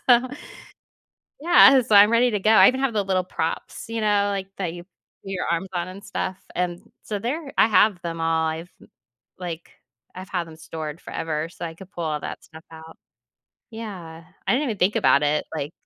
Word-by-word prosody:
So 245 0 +4 1.1
yeah. 290 -5 +7
So 225 -3 0
I'm 205 +1 +8
ready 245 +1 +4
to 210 - 0
go. 215 - +2
I 220 - +8
even 260 +1 0
have 270 -3 +1
the 205 -2 +1
little 185 -1 0
props, 160 -2 -4
you 225 0 -3
know, 205 -1 +2
like, 195 -1 -4
that 175 -3 -3
you 175 - -9
put 195 +1 -16
your 190 -2 -3
arms 170 +3 -1
on 175 0 -2
and 190 +2 -10
stuff. 190 0 -4 0.2
And 175 -1 -3
so 210 - -4
there 275 +7 -4
I - - +6
have 210 -3 +4
them 165 -1 -5
all. 165 0 +1
I've, 165 +3 -5 0.7
like, 175 -2 -6 0.4
I've 185 +1 -9
had 175 -3 -2
them 160 -1 -12
stored 160 -1 -7
forever 160 0 -3
so 170 0 -9
I 165 - -8
could 190 +2 -13
pull 170 - -4
all 155 -1 -2
that - - -7
stuff 160 0 -14
out. 160 0 -12 0.8
Yeah. 185 -8 -8 0.2
I - - +3
didn't 270 +4 +1
even 215 - -3
think 190 +4 +2
about 140 - +4
it. 150 +1 +1
Like 145 -1 -4
185 Hz, 205 wpm, -23 LUFS, 165-215 Hz, 1.1 s, I'm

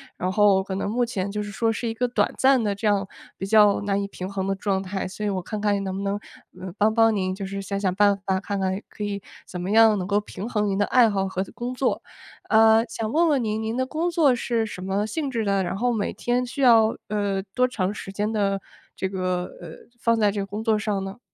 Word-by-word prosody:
然 185 +1 -2
后 205 -2 +4
可 190 0 -5
能 195 - -2
目 240 +4 0
前 200 -4 -2
就 210 - -2
是 205 - -5
说 225 +3 0
是 230 +1 -3
一 225 - -2
个 250 +2 0
短 245 - +1
暂 265 -2 +4
的 205 -2 0
这 200 - -6
样 200 -1 +1 0.3
比 195 - -5
较 210 -1 +5
难 200 -1 0
以 200 - -2
平 185 -1 -6
衡 195 -1 -3
的 195 - 0
状 195 0 -1
态， 190 0 -3
所 205 +3 -6
以 - - +1
我 190 -2 -2
看 210 +4 -5
看 205 -1 +1
能 190 -1 -3
不 200 - -4
能， 200 - 0 0.5
呃， 185 -1 -6
帮 215 +1 +3
帮 225 -1 +4
您 185 -1 -1
就 195 0 -5
是 195 0 -5
想 200 0 -3
想 190 -2 0
办 205 0 +4
法， 190 -1 +1
看 200 0 -3
看 190 0 -1
可 210 - -8
以 205 -1 -2 0.3
怎 180 - -6
么 185 +3 -3
样 225 -1 +6
能 185 -2 -3
够 205 +1 +2
平 205 0 -7
衡 210 -3 0
您 195 -1 0
的 205 - +2
爱 240 -1 +5
好 195 -1 0
和 190 0 -2
的 - - -13
工 240 +1 -5
作。 255 0 -1 0.5
呃， 220 0 +6
想 225 0 -4
问 335 +2 +3
问 280 -6 +2
您， 215 0 -1
您 220 +1 -2
的 260 - +1
工 325 +5 -1
作 315 -6 +4
是 230 -1 -1
什 185 -4 -7
么 195 +2 -1
性 280 +6 -3
质 230 -4 -2
的？ 200 -1 +1
然 185 +2 -3
后 245 +2 +1
每 210 -3 -1
天 245 +1 -1
需 275 +3 -5
要， 225 -3 +5
呃， 200 -2 -1
多 250 0 +3
长 205 -5 -2
时 195 - -8
间 210 +2 -2
的 195 -2 +1 0.4
这 190 - -2
个 185 -2 -2 0.2
呃， 175 - -8 0.3
放 230 -1 +2
在 210 -2 +3
这 200 -1 -2
工 205 +2 -5
作 220 -2 +2
上 205 -2 -1
呢？ 195 +3 -7
205 Hz, 280 characters per minute, -24 LUFS, 195-225 Hz, 0.5 s, 样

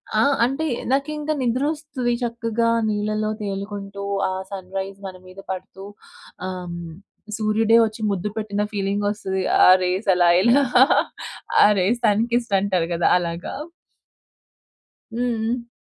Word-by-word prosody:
ఆ! - - +3 0.3
అంటే 275 +6 -2 0.3
నాకు 275 +2 +1
ఇంకా 300 +1 -2
నిద్ర 250 +2 0
వస్తుది. 275 -6 -3
చక్కగా 230 -1 -1 0.2
నీళ్ళలో 215 +1 -1
తేలుకుంటూ 200 0 -5 0.3
ఆ - - -2 0.2
సన్‌రైస్ 195 +1 -6
మన 185 - -8
మీద 185 +1 -13
పడుతూ 190 +1 -7 0.6
ఆహ్, 180 -2 -6 0.6
సూర్యుడే 220 +1 +3
వచ్చి 220 +1 -6
ముద్దు 195 +2 -2
పెట్టిన 210 -1 -2
ఫీలింగ్ 200 +1 -1
వస్తది. 190 -2 -3 0.2
ఆ - - +8
రేస్ 185 +4 -1
అలా 175 -1 +4
ఇలా 245 +6 +4 1.0
ఆ - - +8
రేస్ 225 +7 +1
సన్ 210 +1 +3
కీస్ 240 -1 0
అంటారు 185 -4 0
కదా 170 - +1
అలాగా. 170 0 -4 1.6
హ్మ్, 245 - -1 0.2
హ్మ్. 235 +1 -2
210 Hz, 130 wpm, -22 LUFS, 190-235 Hz, 1.6 s, ఆ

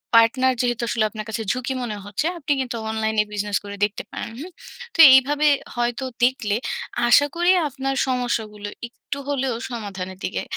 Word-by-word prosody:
Partner 255 +3 +5
যেহেতু 240 -1 -1
আসলে 230 - +1
আপনার 215 0 -7
কাছে 220 +1 -3
ঝুঁকি 255 +1 -2
মনে 220 -3 -4
হচ্ছে, 205 +8 -3
আপনি 300 -2 -4
কিন্তু 245 -2 -4
অনলাইনে 220 -1 +1
বিজনেস 205 0 -1
করে 200 0 -7
দেখতে 205 - -6
পারেন। - - -5
হুম? 345 +6 -8 0.4
তো - - -8
এইভাবে 290 +3 +4 0.3
হয়তো 240 +1 -1 0.2
দেখলে 245 -5 +2 0.5
আশা 265 +4 +6
করি 350 +1 +3 0.2
আপনার 270 -1 -3
সমস্যাগুলো 225 -5 -2 0.2
একটু 250 +3 -8
হলেও 265 -3 0
সমাধানের 195 -6 -6
দিকে - - -2
240 Hz, 160 wpm, -22 LUFS, 215-265 Hz, 0.5 s, আশা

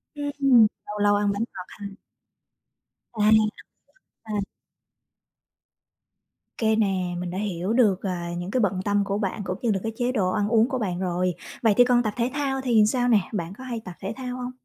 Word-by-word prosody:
Ừm, 275 -6 +4 0.2
lâu 210 0 -6
lâu 205 0 +4
ăn 205 0 +1
bánh 205 +3 -1
ngọt 185 - -7
ha. 205 - -10 1.3
À, 220 - -9
ăn 215 - +6
mì 220 - +7 0.9
gói, 215 -1 -3
à. 200 - -5 2.1
Kê 220 -1 +2
nè, 190 -5 0
mình 180 0 -4
đã 185 - -5
hiểu 195 0 -2
được, 210 -7 +3
à, 175 -3 -3
những 175 +2 -5
cái 255 - +1
bận 190 -2 +1
tâm 205 0 +2
của 200 +1 -1
bạn 205 0 -2
cũng 185 0 -3
như 235 - +1
là 195 - 0
cái 225 - -2
chế 245 +2 0
độ 195 -7 +1
ăn 205 +1 0
uống 230 +1 +4
của 265 - -1
bạn 180 -4 -2
rồi. 180 0 0 0.3
Vậy 220 -3 +5
thì 245 - +7
còn 245 -1 +3
tập 215 -2 -1
thể 240 +2 0
thao 275 -2 -1
thì 235 -4 +4
sao 245 +1 +1
nè, 230 -4 +5
bạn 175 -3 -3
có 260 - -10
hay 240 -3 -4
tập 180 - -7
thể 195 +2 -4
thao 250 -1 -5
hông? 250 0 -5
210 Hz, 215 wpm, -25 LUFS, 190-245 Hz, 2.1 s, mì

